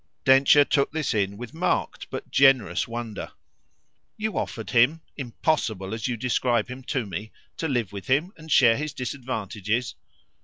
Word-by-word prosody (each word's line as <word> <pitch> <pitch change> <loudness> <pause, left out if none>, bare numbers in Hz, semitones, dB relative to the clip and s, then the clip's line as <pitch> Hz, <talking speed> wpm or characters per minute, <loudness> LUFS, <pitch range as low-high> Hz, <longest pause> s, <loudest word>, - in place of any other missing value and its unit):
Densher 135 +2 +6
took 140 -1 +1
this 155 -5 -1
in 100 -2 0
with 120 +5 -8
marked 165 +3 -1
but - - -7
generous 130 -10 +4
wonder. 115 -2 -6 0.8
"You 215 -2 -3
offered 110 - -4
him 130 +7 +4
'impossible' 115 - -1
as 110 +1 -3
you 120 -2 -2
describe 120 -1 0
him 130 +1 -7
to 130 -4 -1
me 100 +3 -6 0.3
to 165 - -2
live 120 - -1
with 100 -2 -7
him 150 +9 +1
and 160 0 -12
share 115 -5 +6
his 150 0 -4
disadvantages?" 120 -4 -3
125 Hz, 155 wpm, -25 LUFS, 110-140 Hz, 0.8 s, Densher